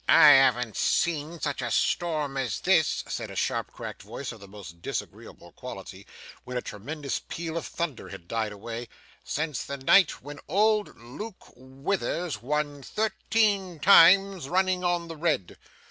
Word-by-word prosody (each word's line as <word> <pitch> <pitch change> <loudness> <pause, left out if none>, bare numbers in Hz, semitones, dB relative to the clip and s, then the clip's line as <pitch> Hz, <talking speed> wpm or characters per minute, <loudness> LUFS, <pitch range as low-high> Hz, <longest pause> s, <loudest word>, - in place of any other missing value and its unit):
'I 150 - +9
haven't 125 -5 +5
seen 165 0 0
such 145 -2 -2
a - - -2
storm 155 -5 0
as 125 -8 -2
this,' 175 -5 +2
said - - -4
a - - -9
sharp - - -1
cracked - - -8
voice - - -6
of - - -12
most 95 -4 -11
disagreeable - - -7
quality, - - -9 0.4
when 125 0 -5
a - - -1
tremendous 140 +7 -5
peal 165 -1 -4
of 165 - -3
thunder 165 -7 -4
had 95 -3 -10
died 110 0 -2
away, 115 +3 -7 0.4
'since 150 -6 -2
the 140 - -5
night 165 +6 +4
when 145 0 -9
old 210 +4 +2
Luke 165 - -10
Withers 135 - -3
won 145 +2 -2
thirteen 205 - 0
times 190 -1 +6
running 185 0 +1
on 175 -1 0
the 165 - -7
red. 150 - -1
150 Hz, 150 wpm, -27 LUFS, 125-180 Hz, 0.4 s, I